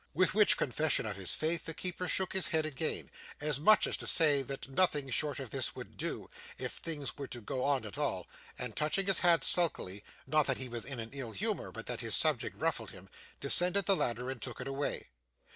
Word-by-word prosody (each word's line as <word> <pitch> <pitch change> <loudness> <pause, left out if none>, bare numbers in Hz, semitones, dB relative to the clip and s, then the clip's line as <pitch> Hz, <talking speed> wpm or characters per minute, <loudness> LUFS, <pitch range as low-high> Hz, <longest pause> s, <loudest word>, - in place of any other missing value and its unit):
With 185 +3 +3
which 210 0 +5
confession 150 +2 +1
of 105 -2 -3
his 95 -2 -1
faith, 160 +2 -1
the 160 - -5
keeper 180 0 -4
shook 190 0 +1
his 190 -1 +2
head 160 -1 +1
again, 155 +1 -2 0.3
as 150 -2 +1
much 215 +7 +5
as - - 0
to - - -5
say 150 -4 +5
that 135 +1 -6
nothing 145 -2 +1
short 145 +2 0
of 130 -5 -7
this - - 0
would - - -9
do, - - -4 0.3
if - - -5
things 145 -4 -4
were 140 - -5
to 120 - -7
go 125 +3 -4
on 140 -4 +1
at 110 +7 -7
all; 95 -12 -1 0.3
and 125 -3 -4
touching 155 +6 0
his 195 -2 +3
hat 170 -1 +4
sulkily 105 - +2 0.2
not 150 +2 +2
that 135 - +1
he 130 -1 -5
was 120 -1 -4
in 135 -3 -2
an 115 0 -7
ill 130 -5 -6
humour, 100 - -2
but - - -8
that - - -3
his - - +2
subject - - +1
ruffled - - -1
him - - -13 0.3
descended 180 +2 +5
the 195 - +4
ladder, 125 -3 -2
and 130 - -8
took 120 - -7
it 125 - -6
away. 135 +1 -3
145 Hz, 225 wpm, -32 LUFS, 125-165 Hz, 0.3 s, which